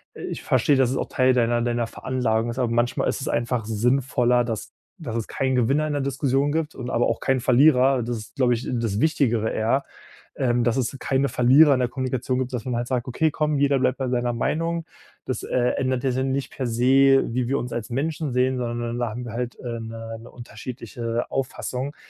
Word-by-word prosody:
„ich - - -6
versteh, 145 - +2
dass 130 -2 +3
es 135 - -1
auch - - -2
Teil 130 0 +3
deiner 120 -1 +2
deiner 120 -1 0
Veranlagung 120 -2 -1
ist“, 115 - -5
aber 125 -3 0
manchmal 120 +1 +1
ist - - -2
es - - -4
einfach 120 -1 -1
sinnvoller, 125 +2 +2
dass 115 -3 -5 0.3
dass 120 -8 -5
es 115 -2 -2
keinen 130 -1 -1
Gewinner 135 +5 +2
in 150 - -2
der 145 - -1
Diskussion 140 +1 0
gibt 160 0 -1
und 125 -1 -6
aber 120 - +1
auch - - -1
keinen 135 -1 +1
Verlierer. 130 +1 +4
Das 120 +1 -3
ist, 105 +4 -11
glaube 125 -3 +3
ich, 120 +1 -3
das 115 -3 -1
Wichtigere 120 -8 +1
eher, 115 +6 0 0.5
ähm, 120 -2 +1
dass 120 -2 +2
es 130 +1 -1
keine 135 +1 0
Verlierer 140 +4 +6
in 130 - +1
der 125 - +2
Kommunikation 130 0 -2
gibt, 130 0 -2
dass 120 -3 -3
man 125 -2 -2
halt 120 +1 -2
sagt: 125 -1 -2
„Okay, 155 +5 +1
komm, 150 0 0
jeder 140 -1 +3
bleibt 130 0 +1
bei 130 -2 -2
seiner 120 -1 0
Meinung. 165 +7 -1 0.4
Das, - - -3
äh, - - -4 0.2
ändert 130 -2 -1
ja 130 - +1
dann 130 +1 -1
nicht 140 0 -3
per 130 - -3
se, 135 +3 +4
wie 125 -1 0
wir 135 - +1
uns 125 - -5
als 115 -2 -4
Menschen 145 +2 -2
sehen, 130 +1 +2
sondern 120 0 -3
da 120 -2 0
haben 120 +3 -6
wir 115 - -6
halt, 120 0 -4
ähm, 115 -2 -4
'ne 115 0 -7
'ne 115 - -12
unterschiedliche 120 0 -5
Auffassung.“ 135 +1 -3
125 Hz, 220 wpm, -24 LUFS, 120-135 Hz, 0.5 s, Verlierer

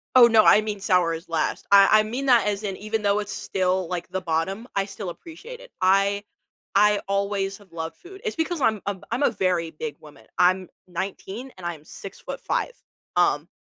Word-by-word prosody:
Oh, 245 -2 +9
no, 225 -2 +5
I 210 - +7
mean 210 -1 -4
sour 180 -4 +2
is 165 +2 -8
last; 165 -2 -1
I 200 0 +8
I - - +3
mean 245 +6 -4
that 240 -4 +5
as 205 0 -1
in 195 -2 -3
even 215 +1 -3
though 200 +1 +2
it's 205 0 -4
still, 185 -1 -1
like, 175 0 -4
the 185 +1 -3
bottom, 185 +7 -2
I 195 -1 +1
still 200 -1 -6
appreciate 345 - -10
it, - - -14
I 195 +2 +3 0.5
I 210 +1 +4
always 200 0 -1
have 200 -4 -20
loved 160 -1 -5
food 385 +2 -13
it's 440 - -2
because 325 -1 -1
I'm 220 -5 +2
I'm 200 -2 -3
I'm 245 +5 0
a - - +4
very 175 -3 0
big 155 -1 -6
woman, 145 -7 -16
I'm 185 0 +3 0.2
19, 195 +7 -5
and 180 - -10
I'm 170 -3 -5
6'5". 195 - -4 0.4
Um - - +2
195 Hz, 200 wpm, -24 LUFS, 180-215 Hz, 0.5 s, Oh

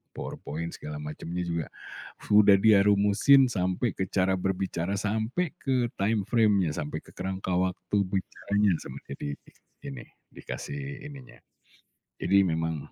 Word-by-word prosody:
PowerPoint 85 +3 -5
segala 75 0 -7
macemnya 80 +4 -5
juga 85 -3 -2 0.7
udah 105 -1 +7
dia 105 -2 +6
rumusin, 105 +7 +5
sampai 95 +4 0
ke 95 - 0
cara 95 0 +1
berbicara, 95 -1 -2
sampai 110 - -1
ke 125 -3 0
timeframe-nya, 105 -3 +2
sampai 75 -2 -3
ke - - -15
kerangka 95 0 -3
waktu 95 +2 -1
bicaranya. 100 +1 0
Sama - - -8
dia - - -4 0.7
ini, 70 -3 -7 0.3
dikasih 70 - -7
ininya 130 -5 -12 0.8
jadi 100 0 +4
memang 80 -2 -2
95 Hz, 120 wpm, -28 LUFS, 85-105 Hz, 0.8 s, udah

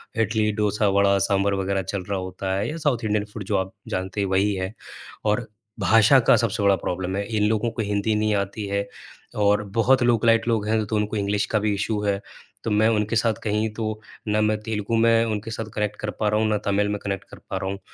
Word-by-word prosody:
इडली, 110 -1 +1
दोसा, 105 0 +1
वडा, 100 0 +3
सांभर 100 +1 +2
वग़ैरह 95 0 0
चल 95 +1 -4
रहा 100 -1 -1
होता 95 +1 -4
है, 100 +2 -1
या 155 - -4
साउथ 140 -7 0
इंडियन 105 -1 0
फूड 110 - -5
जो 100 +1 0
आप 95 0 -2 0.2
जानते 95 +2 -2
हैं 100 - 0
वही 95 +2 +2
है 95 +2 -3 0.5
और 105 +2 +1 0.3
भाषा 110 +7 +6
का - - +7
सबसे 115 -2 0
बड़ा 100 -1 +5
प्रॉब्लम 95 +1 -3
है, 100 - -1
इन 105 - +2
लोगों 110 +2 +1
को 115 - -3
हिंदी 105 +1 0
नहीं 105 0 +1
आती 100 +1 -2
है 100 0 -1 0.5
और 105 0 +3
बहुत 130 +2 +4
लोकेलाइट 115 -1 +3
लोग 110 -3 +1
हैं 110 -1 +1
तो 110 - -2
उनको 105 0 -1
इंग्लिश 100 0 0
का 110 - +2
भी 105 0 0
इशू 105 +1 -1
है। 100 -1 0 0.4
तो 115 - -2
मैं 105 +1 +4
उनके 110 0 0
साथ 115 0 +2
कहीं 105 +1 0
तो 110 -1 -3 0.3
ना 105 0 +1
मैं 105 0 +2
तेलुगु 110 0 -2
में 115 0 +4
उनके 110 0 -3
साथ 115 0 -4
कनेक्ट 105 -1 -1
कर 105 - -3
पा 110 - +1
रहा 105 - +1
हूँ, 110 - +2
ना 105 - +2
तमिल 100 +1 0
में 105 - -1
कनेक्ट 100 -2 -4
कर - - -11
पा - - -2
रहा 95 - -3
हूँ। 100 - -6
105 Hz, 235 wpm, -24 LUFS, 100-110 Hz, 0.5 s, का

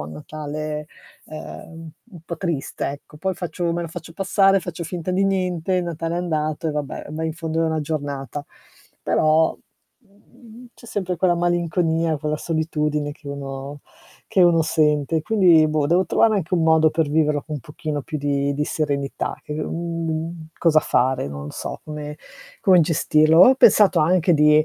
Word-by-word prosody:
un 75 +1 -7
Natale, 150 - -6 0.4
ehm, 160 +1 -9 0.2
u 190 - -17
un 170 - -10
po' 170 - -5
triste, 165 -7 -3
ecco. 145 +1 -10
Poi 190 +3 -1
faccio 175 -1 -3
me 170 0 -2
lo 170 - -5
faccio 160 +1 -9
passare, 195 0 +3
faccio 175 -1 -6
finta 175 +1 -4
di 190 +2 +1
niente, 185 -2 0
il 180 -1 +1
Natale 165 0 -3
è - - -1
andato 155 -2 -2
e - - 0
vabbè, 145 -1 -5
ma 160 +1 -4
in 160 -1 -2
fondo 165 -1 -3
è - - +2
una 160 -1 -1
giornata. 145 -2 -4 0.6
Però, 155 +1 +3 0.4
mhmm, 230 +2 -17
c'è - - -16
sempre 185 -5 -3
quella 175 0 +2
malinconia, 170 -2 0
quella 150 +1 -2
solitudine 150 -2 -1
che 150 -1 -12
uno 140 0 -6 0.5
che 185 - +3
uno 170 -1 +5
sente. 155 0 +1
Quindi 175 -6 +5
boh, 155 -1 +1
devo 175 +5 +3
trovare 220 +3 +3
anche 185 -2 -4
un 165 - +1
modo 160 -1 +4
per 155 -1 0
viverlo 150 -1 +1
con 155 - -7
un - - -8
pochino 150 +2 -5
più 155 - -5
di 140 0 0
di 150 - -1
serenità 140 -3 -2
che - - -7
mhmm, 165 0 -4
cosa 155 -2 +4
fare, 130 - +1
non 70 0 -7
lo - - -7
so - - -6
come 150 -1 -7 0.5
come 185 -4 +6
gestirlo. 160 0 +3
Ho 255 +7 +8
pensato 205 -7 +6
anche 175 +2 +3
di 150 0 +5
160 Hz, 180 wpm, -22 LUFS, 150-175 Hz, 0.6 s, Ho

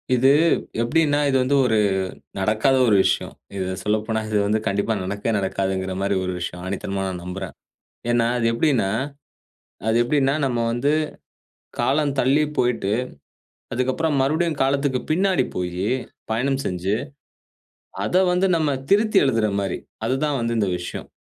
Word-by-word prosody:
இது 130 +2 +4 0.5
எப்டின்னா 145 +4 +2
இது 135 - +3
வந்து 135 +3 +1
ஒரு 110 -3 +2 0.6
நடக்காத 110 +7 +2
ஒரு 105 - +5
விஷயம். - - 0 0.2
இத 95 -1 -2
சொல்லப்போனா 110 +1 0
இது 105 - +1
வந்து 110 +1 +2
கண்டிப்பா 100 +3 0
நடக்கவே 100 +4 -2
நடக்காதுங்குற 95 -1 -2
மாரி 100 0 +1
ஒரு 90 - -2
விஷயம். 90 0 -5
ஆணித்தனமா 95 +1 -3
நான் 90 -2 -5
நம்புறேன். 90 0 -6 0.6
ஏன்னா 120 -1 +3
அது 115 - +1
எப்டின்னா. 115 -5 +2 1.0
அது 110 - +2
எப்டின்னா, 135 +2 +2
நம்ம 125 -3 0
வந்து, 120 +5 +1 0.9
காலம் 145 +1 +2
தள்ளி 140 +4 +3
போயிட்டு. 115 -5 +1 0.8
அதுக்கப்புறம் 130 +5 0
மறுபடியும் 155 +3 +1
காலத்துக்கு 135 -1 +1
பின்னாடி 185 -3 +2
போயி. 90 +1 -2 0.5
பயணம் 135 +4 0
செஞ்சு. 90 +2 -1 1.1
அத 110 - -2 0.2
வந்து 180 +2 +2
நம்ம 155 -3 +1 0.2
திருத்தி 210 +1 +4
எழுதுற 115 -6 +2
மாரி. 100 -1 -2 0.3
அதுதான் 140 +2 0
வந்து 115 0 -1
இந்த 105 -3 +1
விஷயம். 85 - -6
120 Hz, 135 wpm, -22 LUFS, 100-140 Hz, 1.1 s, ஒரு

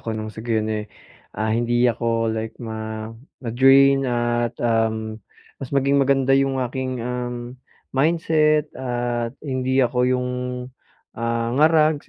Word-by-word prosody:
ako 110 -1 -4
nang 110 0 -5
sa 110 - -8
gayon, 110 -2 0
eh, 105 -1 -3 0.5
ah, 110 +1 0
hindi 120 +1 +1
ako 115 -1 +1
like 110 0 -4
ma 110 -1 -6 0.3
ma-drain 135 +3 +5
at 120 -1 0
um, 110 -1 -1 0.4
mas 135 - -5
maging 140 0 +2
maganda 135 -1 +2
'yong 135 0 +2
aking, 130 +1 -3
um, 125 0 -5 0.3
mindset 155 0 +2
at 120 -1 -3
hindi 130 -1 +1
ako 125 +1 -2
'yong, 125 0 0 0.8
ah, 115 0 -2
ngarag 155 -1 +3
120 Hz, 130 wpm, -22 LUFS, 115-135 Hz, 0.8 s, ma-drain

